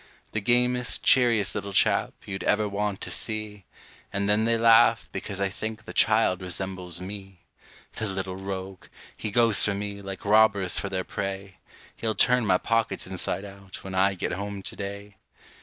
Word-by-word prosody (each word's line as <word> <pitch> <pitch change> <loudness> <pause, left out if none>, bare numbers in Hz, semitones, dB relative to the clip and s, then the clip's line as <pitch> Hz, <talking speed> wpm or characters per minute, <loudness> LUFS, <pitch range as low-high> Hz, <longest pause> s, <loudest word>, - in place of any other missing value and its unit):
The 105 - -2
gamest, 125 +2 +2
cheeriest 120 -6 +3
little 100 0 -4
chap, - - +2
you'd 95 -2 -5
ever 105 - +2
want 100 -1 -2
to - - -4
see! 105 -3 -2 0.5
And 100 0 -1
then 105 +2 +3
they 115 0 +2
laugh, 115 0 +5
because 100 - -5
I 100 0 +1
think 110 +2 -6
the - - -8
child 110 -4 +3
resembles 90 -1 -3
me. 95 -1 -9 0.5
The 110 - -3
little 95 -1 -4
rogue! 95 -1 -6 0.3
he 110 - -4
goes 115 0 +4
for 100 - +2
me, 100 0 -5
like 95 -1 -8
robbers 100 -3 +4
for 100 - -4
their 95 -1 -2
prey; 95 0 -5 0.4
He'll 110 -1 -2
turn 125 +2 +3
my 90 -2 +4
pockets 115 -3 -1
inside 95 +1 -3
out, 100 -1 -11
when 95 - -7
I 95 +1 +2
get - - -3
home 100 +1 -5
to - - -2
day. 100 0 -7
100 Hz, 175 wpm, -26 LUFS, 95-110 Hz, 0.5 s, laugh